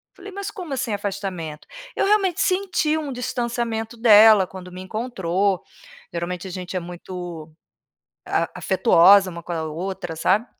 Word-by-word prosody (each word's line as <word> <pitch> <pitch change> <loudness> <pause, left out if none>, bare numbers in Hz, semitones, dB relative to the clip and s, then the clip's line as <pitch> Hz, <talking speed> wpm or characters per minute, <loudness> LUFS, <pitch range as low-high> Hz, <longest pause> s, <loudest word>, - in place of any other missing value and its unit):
falei: 395 +1 -10
"Mas 400 +2 -5
como 355 -9 -7
assim, 245 -5 -2
afastamento?". 190 -6 -5 0.3
Eu - - +1
realmente 395 -4 +2
senti 365 -5 +1
um 295 -3 -4
distanciamento 235 -2 -3
dela 215 -4 +7
quando 185 -1 -10
me 185 +1 -8
encontrou, 195 -3 -1 0.5
geralmente 175 +2 -4
a - - -7
gente 185 +1 -6
é - - 0
muito, 175 -2 -8 0.7
ah, - - 0
afetuosa 190 +1 +5
uma 170 0 -8
com 175 - -7
a 160 -1 -2
outra 170 +2 -5
sabe, 200 +8 +2
195 Hz, 145 wpm, -22 LUFS, 180-245 Hz, 0.7 s, dela